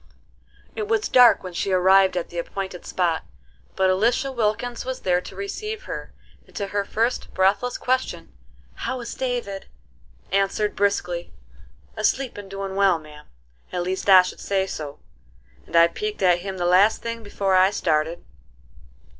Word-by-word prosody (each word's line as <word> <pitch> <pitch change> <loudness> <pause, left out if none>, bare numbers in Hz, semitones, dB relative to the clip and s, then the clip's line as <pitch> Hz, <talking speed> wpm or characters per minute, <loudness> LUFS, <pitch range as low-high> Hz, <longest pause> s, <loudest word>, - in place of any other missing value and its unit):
It 430 -1 -3
was 430 -1 +1
dark 250 -2 +6
when 185 -1 -7
she 195 +3 -2
arrived 190 0 +4
at 175 - -3
the 175 - -5
appointed 190 +1 -5
spot; 170 -3 0 0.5
but 190 -1 +3
Elisha 235 +8 +1
Wilkins 235 0 -1
was 260 0 -5
there 180 -1 +1
to 190 - -11
receive 420 - -5
her, - - -7 0.4
and - - -22
to 200 -1 -3
her 205 0 +1
first 230 +4 -1
breathless 200 +6 +2
question, 255 +1 -2 0.4
"How 260 - -4
is 235 - -6
David?" 240 -7 -3 0.6
answered 195 +2 +1
briskly: 180 -4 -1 0.6
"Asleep 265 -2 0
and 205 -1 -9
doin' 195 0 -5
well, 195 -3 +4
ma'am. 150 -1 -14 0.4
At 180 - -2
least 190 +2 -3
I 185 -1 +9
should 180 - -7
say 195 -1 0
so, 150 -6 -6 0.7
and - - -7
I 170 0 +7
peeked 210 +4 -4
at 175 -1 +4
him 190 +1 -6
the 175 - -1
last 190 +5 +4
thing 230 0 -4
before 200 -2 -1
I 185 +1 +6
started." 165 -4 -1
195 Hz, 160 wpm, -23 LUFS, 180-225 Hz, 0.7 s, I